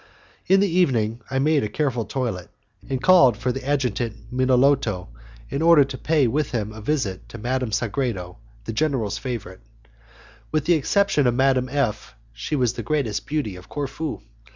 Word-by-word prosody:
In 195 +1 +5
the 200 - +3
evening 120 - +1
I 135 - -2
made 150 +1 +2
a 105 - -2
careful 125 -6 -1
toilet, 110 -5 -3 0.4
and 135 -1 -1
called 135 - +6
for 125 - -1
the 135 +1 -5
Adjutant 125 -5 -2
Minolto 130 - +2 0.4
in 140 - -2
order 165 -3 +7
to 135 0 -6
pay 155 +1 +2
with 145 +5 0
him 110 -2 -2
a 110 - -9
visit 110 -7 -2
to - - -9
Madame 125 +1 -2
Sagredo, 105 - -2 0.3
the - - -4
general's 125 -6 -1
favourite. 115 -8 -6 0.9
With 155 -2 0
the 175 - +4
exception 170 -1 +2
of 120 - +1
Madame 130 -1 +2
F 120 - -2 0.2
she 150 - -3
was 125 -4 +1
the - - -5
greatest 140 -9 -2
beauty 145 -10 -2
of 90 +1 -13
Corfu. 145 +2 -4
130 Hz, 170 wpm, -23 LUFS, 110-145 Hz, 0.9 s, order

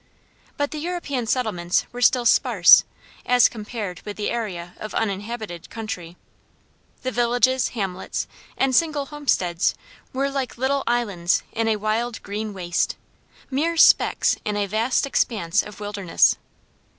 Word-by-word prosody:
But 285 0 -1
the 305 - -5
European 295 -8 -3
settlements 195 -8 0
were 245 - -7
still 245 0 +4
sparse, - - +6 0.4
as 250 0 +5
compared 210 -5 -6
with 205 - -8
the 210 - -2
area 180 -7 -4
of 215 - -7
uninhabited 205 -3 -4
country. 180 -6 -6 0.9
The 255 - -1
villages, 245 +1 +2
hamlets, 190 -3 -3 0.3
and 265 -1 +2
single 305 -2 +2
homesteads 265 - 0 0.4
were 275 +1 -1
like 270 -4 -3
little 270 +2 0
islands 205 -8 +1
in 225 0 -1
a 220 - +2
wild 220 +3 -2
green 210 +2 -4
waste: 180 -3 -1 0.6
mere 325 +5 0
specks - - +5
in 210 -1 -2
a 205 - +1
vast 225 +7 0
expanse 210 -8 +1
of 210 -1 -11
wilderness. 205 -4 +2
225 Hz, 135 wpm, -23 LUFS, 200-255 Hz, 0.9 s, sparse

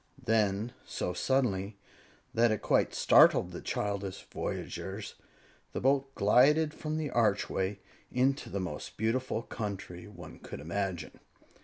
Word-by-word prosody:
Then, 110 +1 +1
so 90 - -3
suddenly 100 -2 0 0.6
that 120 +1 +4
it 110 -2 -1
quite - - +2
startled - - +6
the - - -7
childish 100 -2 -3
voyagers, 100 +2 -4 0.6
the - - -2
boat 135 +1 +1
glided 150 +9 +4
from 155 0 -3
the 155 -4 -2
archway 100 -3 +1 0.3
into 135 +2 +1
the 100 - -3
most 85 -5 -5
beautiful 115 +2 0
country 100 -6 -6
one - - -11
could - - -8
imagine. 90 +2 -3
105 Hz, 125 wpm, -31 LUFS, 95-130 Hz, 0.6 s, startled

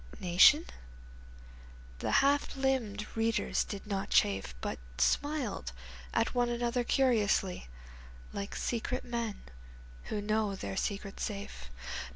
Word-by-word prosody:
Nation? 185 - +6 1.3
The - - -2 0.2
half 285 +1 +2
limbed 255 -6 0
readers 225 0 +1
did 200 -2 -7
not 200 -2 -2
chafe 95 -11 +2
But - - -4 0.2
smiled 240 - 0 0.4
at 230 - +1
one 245 -1 +2
another 240 +1 0
curiously 215 - +2 0.7
Like 200 0 -4
secret 245 +2 -2
men 235 -3 -3 0.6
who 215 - -2
know 210 -1 0
their 100 - -5
secret 200 - -3
safe. 200 - -5
215 Hz, 110 wpm, -32 LUFS, 195-245 Hz, 1.3 s, Nation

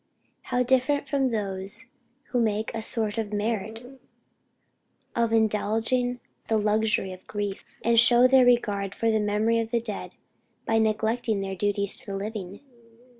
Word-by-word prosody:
How 250 0 +1
different 265 +3 +1
from 275 -2 +1
those 200 0 -3 0.5
who 245 - +1
make 215 0 -1
a 225 - -3
sort 220 -1 0
of 215 -2 -3
merit 220 +1 -3 1.3
of 235 -1 +1
"indulging 225 +3 +1 0.3
the 220 - +2
luxury 210 -2 +1
of 185 - -14
grief;" 205 -2 -5
and 235 0 +5
show 240 +1 +6
their 260 0 +6
regard 205 -5 +1
for 230 0 +1
the 220 - +2
memory 210 +2 +1
of 225 -1 -2
the 235 0 +1
dead 220 -3 -6 0.5
by 225 0 +2
neglecting 220 0 0
their 195 0 -4
duties 200 0 +1
to - - -6
the 195 -1 -4
living! 200 -2 -6
220 Hz, 150 wpm, -26 LUFS, 205-235 Hz, 1.3 s, show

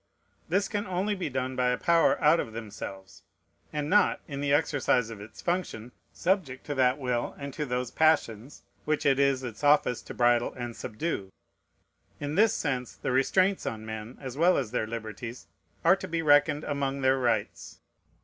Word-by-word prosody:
This 195 +4 +1
can 205 0 -3
only 185 +3 -1
be 185 -6 -3
done 130 -1 -3
by 125 -1 +2
a 125 - +1
power 170 -1 +3
out 155 +2 +5
of 110 - -4
themselves, 100 -3 -8 0.5
and 150 -1 -2
not, 205 +4 +3
in 140 -3 -5
the 145 -1 0
exercise 140 -5 +2
of 105 -3 -9
its 105 - -12
function, 165 -10 -2 0.2
subject 175 -10 -1
to 145 - -3
that 130 -1 +3
will 125 -4 -2
and 140 -1 -7
to 150 0 -3
those 125 -1 -2
passions 140 -6 +1 0.2
which 155 0 -1
it 135 -1 +3
is 140 -2 +2
its 120 +1 -7
office 145 -4 +3
to - - -10
bridle 120 -1 +2
and 120 -2 -5
subdue. 110 - -4 0.9
In 145 0 -3
this 210 +5 +4
sense 125 -5 -2
the - - -3
restraints 185 +9 +2
on 110 -1 -4
men, 110 +2 -7
as 130 -3 -7
well 175 +5 +4
as 120 -6 -2
their 110 -3 -1
liberties, 115 +2 -7 0.4
are - - +7
to - - -7
be 165 0 -2
reckoned 145 0 +4
among 140 -1 -2
their 130 0 +3
rights. 115 -5 -2
135 Hz, 180 wpm, -28 LUFS, 120-155 Hz, 0.9 s, are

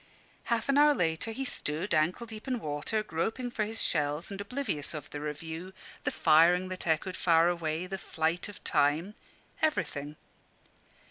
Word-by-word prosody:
Half 230 -2 0
an 275 +1 +4
hour 295 0 +6
later 165 +2 0
he 270 +4 -3
stood, 165 - -2
ankle 160 +9 +2
deep 220 0 -9
in 255 -1 0
water, 150 +7 -2
groping 220 +8 -2
for 215 -2 0
his 225 +1 -4
shells 150 +4 0
and 200 0 -4
oblivious 200 - -3
of 150 - -7
the 145 - -5
review, 160 +4 -5 0.3
the - - +2
firing 175 +4 +5
that 185 -1 -5
echoed 165 +3 +1
far 165 0 +4
away, 165 -1 -1
the 190 +1 -5
flight 165 +4 -1
of 205 - -12
time 150 +7 +2 0.5
everything. 150 - 0
175 Hz, 160 wpm, -30 LUFS, 155-215 Hz, 0.5 s, hour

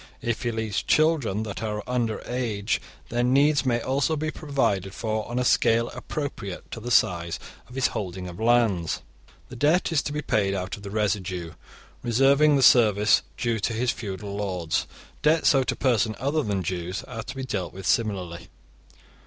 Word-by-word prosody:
If 120 -1 -1
he 120 - -1
leaves 110 -3 -2
children 150 -10 +2
that 105 0 -6
are 105 -1 -3
under 120 -3 -1
age, 110 -5 -1 0.3
their 120 +1 0
needs 140 +3 +3
may 120 -2 +2
also 140 +5 +1
be 155 +1 -2
provided 100 - -1
for 110 -1 -2
on 120 - -3
a 125 - +1
scale 115 0 +3
appropriate 115 -11 -6
to - - -5
the 120 +2 -6
size 85 -6 +2 0.3
of 125 - -12
his 135 - +1
holding 95 -2 -5
of 90 +2 -9
lands. 110 -8 +2 0.5
The 130 - -9
debt 155 +9 +2
is 155 -3 +3
to - - -4
be 150 0 -3
paid 100 -2 +1
out 90 +2 -3
of 100 - -13
the 100 - -7
residue, 95 -5 -2 0.5
reserving 135 +5 +4
the 135 - +3
service 105 -4 +5 0.2
due 115 -2 0
to 110 +3 -1
his 120 +2 +1
feudal 100 -1 -6
lords. 90 -5 -1 0.3
Debts 160 +1 +4
owed 135 -2 +2
to - - 0
persons 115 -4 +1
other 145 +4 +1
than 100 -7 -1
Jews 90 +2 -3
are 115 -3 -6
to 135 +5 -8
be 135 - -4
dealt 100 -8 -3
with 95 0 -9
similarly. 90 -7 -1
115 Hz, 180 wpm, -25 LUFS, 100-130 Hz, 0.5 s, service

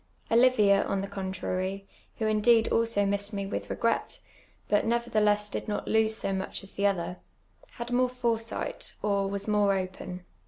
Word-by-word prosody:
Olivia, 225 -5 +5
on 195 - -1
the 195 - -4
contrar}*, 190 0 -3 0.3
who 220 - -1
indeed 220 +1 +4
also 230 -3 +2
missed 200 +1 0
me 200 -1 -2
with 195 - -4
refi^ret, - - -1 0.5
but 205 - +3
nevertheless 215 -3 +2
did 210 - -4
not 210 - -3
lose 220 0 +3
so 195 - -1
much 190 0 -4
as 195 - -5
the 200 0 +2
other, 180 -2 -2 0.6
had 235 +1 -6
more 250 +1 +3
foresiijht. 230 -3 -3
or 200 -1 +1
was 200 +1 -4
more 205 -2 +3
open. 185 -1 -6
205 Hz, 160 wpm, -28 LUFS, 195-225 Hz, 0.6 s, Olivia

